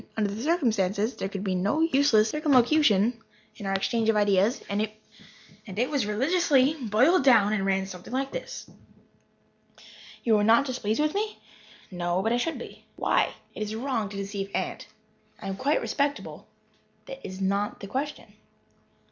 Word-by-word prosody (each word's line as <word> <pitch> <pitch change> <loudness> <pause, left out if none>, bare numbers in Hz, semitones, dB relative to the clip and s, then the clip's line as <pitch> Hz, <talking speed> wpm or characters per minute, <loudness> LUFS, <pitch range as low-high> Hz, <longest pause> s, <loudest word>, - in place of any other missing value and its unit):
Under 205 -2 0
the 215 - -6
circumstances 225 - +1
there 195 - -3
could 195 -1 -5
be 190 -2 -1
no 200 +12 0
useless 275 -9 +4
circumlocution 250 - +3 0.4
in 205 - -6
our 195 - 0
exchange 225 +3 0
of 225 - +3
ideas. 205 +2 +3
It 215 +2 -6
was 270 -8 0
religiously 275 +4 +2
"boiled 265 - +2
down," 220 -6 +5
and 195 -2 0
ran 195 0 +1
something 180 +1 -10
like 270 +2 -2
this: - - -7 1.6
"You 225 -3 +4
are - - +2
not 230 +6 +5
displeased 250 -2 -1
with 305 0 +1
me?" 425 +1 -2 0.5
"No 175 +1 -1
but 225 +2 +1
I - - +2
should 325 +7 -2
be." - - -11
"Why?" - - +1 0.2
"It - - -8
is 215 +1 -3
wrong 230 -4 -2
to 200 - -8
deceive 200 0 -4
Aunt." - - -3 0.5
"I 195 - -7
am 195 - -3
quite 275 +8 +1
respectable." 285 0 -2 0.6
"That - - -9
is 185 0 -7
not 200 +2 -1
the - - -7
question." 275 +7 -5
220 Hz, 160 wpm, -27 LUFS, 200-275 Hz, 1.6 s, down